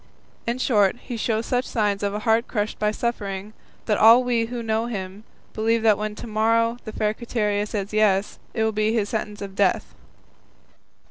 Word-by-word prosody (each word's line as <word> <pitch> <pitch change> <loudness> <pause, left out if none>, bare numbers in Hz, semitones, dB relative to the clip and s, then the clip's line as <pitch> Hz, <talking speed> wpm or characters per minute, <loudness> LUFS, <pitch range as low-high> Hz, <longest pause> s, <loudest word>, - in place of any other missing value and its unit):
In 235 +1 0
short, 210 -7 +3
he 245 - -5
shows 225 0 -1
such 250 0 0
signs 210 -6 -1
of 200 -1 0
a 205 - -3
heart 230 +1 +3
crushed 210 -2 -2
by 210 - +2
suffering, 210 -3 -3 0.3
that 210 -2 +1
all 230 +3 +8
we 240 -2 +1
who 240 0 -5
know 225 +1 0
him 200 -2 -6 0.3
believe 225 +1 +1
that 215 -2 +5
when 210 +1 -4
to - - -8
morrow 230 +1 +1
the 220 - -5
fair 215 0 0
Quiteria 210 -3 -1
says 205 -1 -4
'yes,' 210 -2 +2 0.2
it 220 - +1
will 220 - +2
be 215 0 +1
his 210 -3 0
sentence 210 -2 -4
of 195 -1 -7
death." 195 -2 +1
215 Hz, 190 wpm, -23 LUFS, 205-230 Hz, 0.3 s, all